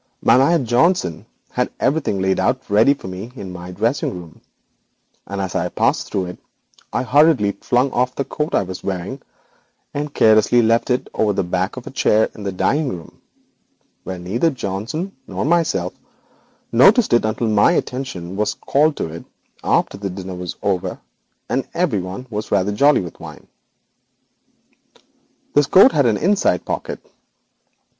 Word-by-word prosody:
My - - +5
man 140 +2 +3
Johnson 120 - +1 0.2
had - - -1
everything 130 -9 0
laid 95 0 +1
out 130 +1 0
ready 115 +7 +5
for 115 - -10
me 95 +6 -7
in 95 -7 -7
my 90 0 -8
dressing 115 +9 -1
room, 85 -2 -14 0.9
and 100 0 -5
as 95 -2 -3
I 90 -1 -1
passed - - 0
through 95 - -1
to - - -6
it - - -13 0.5
I - - -1
hurriedly 140 -6 +4
flung 125 +2 +1
off 125 +1 0
the 140 - -2
coat 150 0 -3
I - - +3
was 95 0 -8
wearing 95 +8 -4 0.7
and 145 +1 -3
carelessly 110 0 +4
left 115 +3 +2
it 125 0 0
hanging - - -3
over 105 -1 +2
the 95 - 0
back 90 +5 -2
of 125 - -7
a - - -7
chair 110 -4 +2
in - - -11
the 100 -1 -3
dining 140 +10 0
room, 85 -6 -9 0.8
where 95 - -5
neither 100 - 0
Johnson 130 - -4
nor - - -3
myself 155 - +1 0.8
noticed 200 - +5
it 120 - +4
until 110 +1 -1
my 105 -1 +4
attention 95 -9 -3
was 105 +1 -1
called 150 +2 +1
to - - -2
it 85 - -8 0.4
after 100 - +1
the 100 -1 -3
dinner 95 0 -7
was 90 -1 -6
over, 95 -3 -1 0.5
and 130 +1 -1
everyone 105 - -1 0.2
rather 100 0 +1
jolly 140 +8 +4
with 85 -3 -9
wine. - - -11 2.1
'This 145 -1 +4
coat 200 - +7
contains 120 - +2
an - - -7
inside 195 - +2
pocket. - - -4
110 Hz, 165 wpm, -20 LUFS, 95-140 Hz, 2.1 s, coat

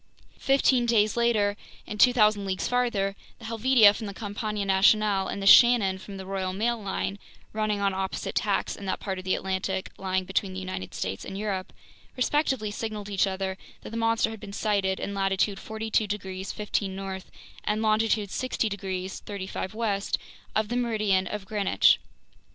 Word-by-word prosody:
Fifteen 265 -3 +3
days 215 -2 +3
later 220 -4 +2 0.3
and 210 - -7
2,000 215 -5 +5
leagues 190 -1 -2
farther, 230 -6 0 0.2
the 230 - -12
Helvetia 230 -1 +5
from 215 +1 -6
the 200 - -7
Compagnie 205 0 -3
Nationale 195 0 +3
and 200 - -4
the - - -3
Shannon 205 -4 +7
from 200 0 -9
the 190 - -7
Royal 190 -1 -2
Mail 230 +3 0
line, 200 0 -3 0.3
running 215 -1 0
on 200 -1 +2
opposite 190 0 -3
tacks - - 0
in 200 - -9
that - - -1
part 190 -2 -4
of 185 - -10
the 185 - +2
Atlantic 190 0 -2
lying 190 -1 0
between 190 +1 -1
the 190 - -4
United 185 - -6
States 95 +1 -3
and 195 - -6
Europe, 200 -3 -3 0.5
respectively 260 -5 +1
signaled 210 -1 -5
each 195 0 +2
other 190 0 -3 0.2
that - - -9
the - - -6
monster 225 -1 +1
had 220 - -8
been 200 0 -9
sighted 200 -3 0
in 200 - -4
latitude 195 0 0
42 220 0 -1
degrees 190 -2 -4
15' 205 -2 -2
north 190 -1 -6 0.3
and 215 +1 0
longitude 215 -2 +2
60 255 -3 -1
degrees 190 -2 -4
35' 195 0 -5
west 210 -3 0 0.4
of 215 -1 +1
the 240 - -2
meridian 210 -6 +1
of 210 0 -5
Greenwich. 205 -1 +3
205 Hz, 175 wpm, -27 LUFS, 190-220 Hz, 0.5 s, Shannon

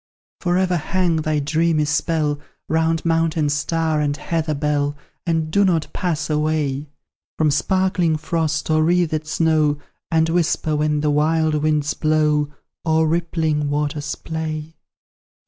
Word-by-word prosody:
For 175 -1 +1
ever 185 -1 +2
hang 175 +1 0
thy 155 -1 0
dreamy 155 +1 +1
spell 150 0 0 0.3
Round 160 0 +1
mountain 165 -2 +1
star 155 +1 0
and 145 0 0
heather 155 0 -2
bell, 145 0 0 0.3
And 160 -2 0
do 200 +4 +4
not 170 -5 +1
pass 160 -5 -1
away 150 -2 0 0.5
From 155 -2 +3
sparkling 180 0 +1
frost, 160 0 -1
or 155 0 +3
wreathed 160 -2 +1
snow, 155 -2 +2 0.3
And 160 0 +2
whisper 165 -2 +1
when 150 0 +1
the 150 -1 +1
wild 155 +1 +2
winds 150 -1 +1
blow, 150 -1 +1 0.3
Or 160 -1 +2
rippling 160 -3 0
waters 145 0 -2
play. 160 -1 -5
155 Hz, 130 wpm, -21 LUFS, 150-165 Hz, 0.5 s, do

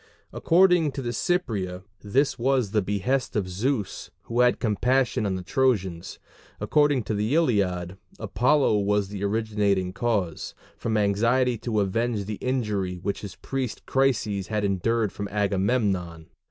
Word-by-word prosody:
According 175 -4 +3
to 135 - -5
the 120 - -2
Cypria 100 - -1 0.2
this 130 +8 +1
was 130 -4 +1
the 105 -1 +2
behest 105 +7 -1
of 100 -4 0
Zeus, 105 +3 -2
who 120 +1 -3
had 125 0 +4
compassion 120 0 +1
on 95 - -1
the 90 - -5
Trojans: 95 -8 0 0.4
according 145 -4 +2
to 110 - -3
the 105 +7 0
Iliad, 95 - +1 0.2
Apollo 130 -5 +2
was 100 -1 0
the 100 -1 -5
originating 100 -3 0
cause, 100 -6 -2 0.2
from 110 -1 -2
anxiety 115 +5 +2
to 110 -3 -1
avenge 105 +1 -1
the 105 0 -5
injury 105 -8 -1
which 100 +3 -4
his 100 -3 -8
priest 130 -4 -4
Chryses 110 -8 0
had 105 -1 -1
endured 105 +2 0
from 100 - -5
Agamemnon. 100 -4 -1
105 Hz, 140 wpm, -25 LUFS, 100-125 Hz, 0.4 s, had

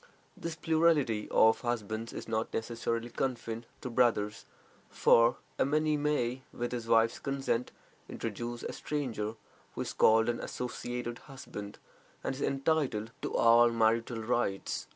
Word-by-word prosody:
This 170 -1 -5
plurality 160 -10 +2
of 110 0 +5
husbands 115 -2 -3
is - - -7
not 110 0 -1
necessarily 115 +1 -2
confined 115 -2 -3
to 130 - -4
brothers, 115 -4 +1 0.4
for 115 +1 +4 0.2
a - - +5
man 150 +1 +1
may, 130 -4 0
with 120 0 -3
his 120 -2 -4
wife's 115 0 +3
consent, 135 -3 -1 0.4
introduce 120 +2 -5
a - - -4
stranger, 115 -7 -3 0.4
who - - -3
is - - -3
called 110 +1 +5
an 120 0 0
"associated 120 -1 -4
husband," 105 -7 -9 0.5
and - - -1
is 135 - -7
entitled 135 -6 0
to - - -3
all 115 +1 +6
marital 115 0 +1
rights. 110 -4 -1
120 Hz, 135 wpm, -31 LUFS, 115-135 Hz, 0.5 s, all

